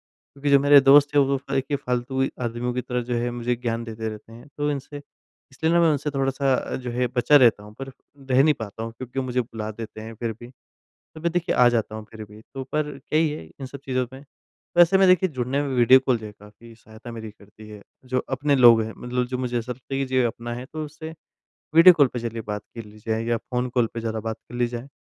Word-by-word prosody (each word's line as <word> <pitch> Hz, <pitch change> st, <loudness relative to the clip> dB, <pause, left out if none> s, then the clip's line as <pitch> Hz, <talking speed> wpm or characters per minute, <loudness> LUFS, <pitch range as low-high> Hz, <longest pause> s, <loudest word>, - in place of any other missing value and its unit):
क्योंकि 140 Hz, +1 st, -5 dB
जो 140 Hz, -, +7 dB
मेरे 145 Hz, 0 st, +7 dB
दोस्त 140 Hz, +1 st, +6 dB
हैं, 145 Hz, -, +6 dB
वो 135 Hz, 0 st, +1 dB
फ़ाय 135 Hz, 0 st, -2 dB
के 140 Hz, +2 st, -2 dB
फ़ालतू 125 Hz, 0 st, -3 dB
ही 135 Hz, -, +1 dB
आदमियों 120 Hz, +1 st, -2 dB
की 125 Hz, -, -1 dB
तरह 125 Hz, 0 st, -3 dB
जो 120 Hz, +1 st, -3 dB
है, 120 Hz, +1 st, -1 dB
मुझे 120 Hz, 0 st, -2 dB
ज्ञान 115 Hz, -1 st, -3 dB
देते 110 Hz, -1 st, -5 dB
रहते 110 Hz, +1 st, -10 dB
हैं, 120 Hz, +5 st, -13 dB
तो 145 Hz, 0 st, 0 dB
इनसे 145 Hz, +1 st, -5 dB, 0.5 s
इसलिए 160 Hz, +5 st, 0 dB
ना 170 Hz, -, +4 dB
मैं 165 Hz, -1 st, +4 dB
उनसे 150 Hz, 0 st, -1 dB
थोड़ा-सा 135 Hz, 0 st, 0 dB
अ, -, -, -3 dB
जो 125 Hz, -1 st, -5 dB
है 125 Hz, +1 st, 0 dB
बचा 135 Hz, +4 st, +5 dB
रहता 115 Hz, -6 st, +5 dB
हूँ, 105 Hz, +1 st, -13 dB
पर 135 Hz, +2 st, -7 dB, 0.4 s
रह 130 Hz, +1 st, +5 dB
नहीं 150 Hz, +1 st, +4 dB
पाता 110 Hz, -2 st, -7 dB
हूँ, 115 Hz, 0 st, -5 dB
क्योंकि 130 Hz, +1 st, -7 dB
वो 135 Hz, -, 0 dB
मुझे 125 Hz, 0 st, -1 dB
बुला 110 Hz, -2 st, -5 dB
देते 110 Hz, 0 st, -8 dB
हैं 110 Hz, +1 st, -8 dB
फिर 115 Hz, +1 st, -3 dB
भी। 120 Hz, -, -10 dB, 0.7 s
तो 155 Hz, -, -10 dB
मैं 170 Hz, -, 0 dB
देखिए 175 Hz, 0 st, 0 dB
आ 125 Hz, -1 st, +6 dB
जाता 115 Hz, -2 st, -1 dB
हूँ 110 Hz, 0 st, -7 dB
फिर 110 Hz, -1 st, -9 dB
भी, 105 Hz, +1 st, -15 dB
तो 135 Hz, -, -4 dB
पर 155 Hz, -, +2 dB, 0.2 s
क्या 150 Hz, +3 st, -1 dB
ही 160 Hz, 0 st, +3 dB
है, 150 Hz, -, -6 dB, 0.2 s
इन 135 Hz, -, -5 dB
सब 140 Hz, +2 st, -9 dB
चीज़ों 130 Hz, -1 st, -1 dB
में? 135 Hz, +2 st, -11 dB, 0.5 s
वैसे 175 Hz, +2 st, +6 dB
में 195 Hz, -, +5 dB
देखिए 185 Hz, +1 st, +4 dB
जुड़ने 130 Hz, -1 st, -2 dB
में 145 Hz, -, -3 dB
वीडियो 125 Hz, +2 st, +7 dB
कॉल 125 Hz, -3 st, +2 dB
जो 110 Hz, -, -8 dB
है, 105 Hz, -, -10 dB
काफ़ी 110 Hz, +3 st, -15 dB
सहायता 110 Hz, +1 st, -12 dB
मेरी 110 Hz, -1 st, -7 dB
करती 105 Hz, +1 st, -16 dB
है, 105 Hz, -1 st, -11 dB, 0.2 s
जो 130 Hz, 0 st, -1 dB, 0.2 s
अपने 145 Hz, +1 st, +1 dB
लोग 120 Hz, -3 st, +7 dB
हैं 110 Hz, 0 st, -5 dB
मतलब 125 Hz, 0 st, -2 dB
जो 125 Hz, 0 st, -3 dB
मुझे 125 Hz, -1 st, -1 dB
ऐसा 120 Hz, +2 st, -4 dB
लगता 130 Hz, +2 st, -9 dB
है 135 Hz, -, -1 dB
कि 135 Hz, -, -1 dB
जो 130 Hz, 0 st, -2 dB
ये 130 Hz, -, +4 dB
अपना 120 Hz, +1 st, -3 dB
है, 125 Hz, +1 st, -7 dB
तो 155 Hz, +2 st, -6 dB
उससे 160 Hz, +2 st, -9 dB, 0.6 s
वीडियो 175 Hz, +2 st, +9 dB
कॉल 145 Hz, -4 st, +5 dB
पे 120 Hz, -, -2 dB
चलिए, 115 Hz, -1 st, -4 dB
बात 105 Hz, -1 st, -5 dB
कर 115 Hz, -2 st, -7 dB
ली 105 Hz, 0 st, -15 dB
जाए 110 Hz, 0 st, 0 dB
या 120 Hz, 0 st, 0 dB
फ़ोन 125 Hz, +2 st, -3 dB
कॉल 120 Hz, -2 st, +3 dB
पर 115 Hz, -, -3 dB
ज़्यादा 110 Hz, -1 st, -3 dB
बात 110 Hz, 0 st, -4 dB
कर 120 Hz, -, -12 dB
ली 120 Hz, 0 st, +1 dB
जाए। 120 Hz, +2 st, -7 dB
125 Hz, 265 wpm, -24 LUFS, 115-140 Hz, 0.7 s, वीडियो